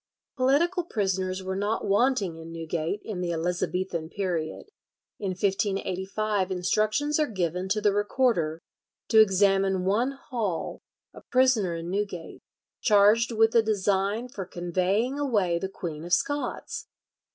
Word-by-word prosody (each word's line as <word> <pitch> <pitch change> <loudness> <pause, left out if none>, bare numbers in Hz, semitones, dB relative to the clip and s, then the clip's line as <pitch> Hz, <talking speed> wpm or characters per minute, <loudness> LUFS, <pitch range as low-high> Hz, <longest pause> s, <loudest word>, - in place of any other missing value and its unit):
Political 320 +7 +2
prisoners 190 - -1
were 190 0 -3
not 205 +3 -1
wanting 205 -4 +2
in 165 0 -10
Newgate 165 +3 -3
in 200 -5 -5
the 175 -1 -1
Elizabethan 175 0 -2
period. 180 - -3 0.5
In 195 -2 -2
1585 195 0 -1
instructions 215 - +1
are 305 - +2
given 180 -3 -2
to 210 +2 +1
the 205 -1 +3
recorder 205 -7 +1 0.5
to 220 - +6
examine 195 -2 +3
one 230 +8 +1
Hall, 225 -10 -4 0.3
a - - -12
prisoner 255 -9 +2
in 165 +1 -5
Newgate, 195 -4 -4 0.4
charged 215 +3 +5
with 225 0 +3
a 230 - +6
design 205 +1 0
for 205 -6 -6
conveying 185 +9 -1
away 205 -12 +1
the 190 - -3
Queen 165 -5 -6
of 175 +1 -3
Scots. 290 - -1
195 Hz, 130 wpm, -27 LUFS, 180-225 Hz, 0.5 s, to